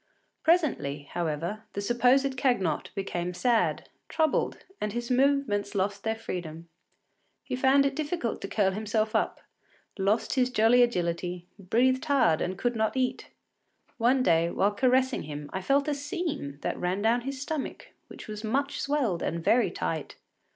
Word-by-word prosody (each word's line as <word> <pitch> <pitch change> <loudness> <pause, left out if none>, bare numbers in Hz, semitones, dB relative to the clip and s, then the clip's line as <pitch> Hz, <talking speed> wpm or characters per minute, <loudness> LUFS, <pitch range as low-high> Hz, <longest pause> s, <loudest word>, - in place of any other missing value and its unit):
Presently, 250 - +1
however, 170 +5 -2
the - - -3
supposed 250 +5 +3
Cagnotte 200 - 0
became 180 -3 -3
sad, 235 +2 +1 0.2
troubled, 315 -2 +1 0.2
and 210 -1 -2
his 240 +1 -3
movements 250 -6 +1
lost 200 +1 -1
their 220 0 0
freedom. 170 -6 -6 0.8
He - - -3
found 265 +2 +4
it 275 0 0
difficult 300 -5 -2
to - - -4
curl 195 -1 +1
himself 215 +2 -1
up, - - 0 0.6
lost 205 +4 +1
his 255 -2 +2
jolly 245 +1 +4
agility, 175 -5 0
breathed 255 - +2
hard 270 - +3
and 185 +1 -2
could 245 +3 -1
not 220 +3 0
eat. 255 -1 -1 0.7
One 255 +3 +3
day, 170 -4 +3
while 200 +4 +1
caressing 255 +3 +2
him, 145 -1 -7
I 190 - -2
felt 275 +9 +2
a 300 - +1
seam 290 - -4
that - - -3
ran 185 +3 -1
down 235 +2 +3
his 270 +2 -5
stomach, 285 +1 -5 0.2
which - - -11
was 210 0 -6
much 275 +6 -1
swelled 270 - 0
and 165 0 -2
very 240 +7 +3
tight. - - -4
225 Hz, 155 wpm, -28 LUFS, 185-265 Hz, 0.8 s, found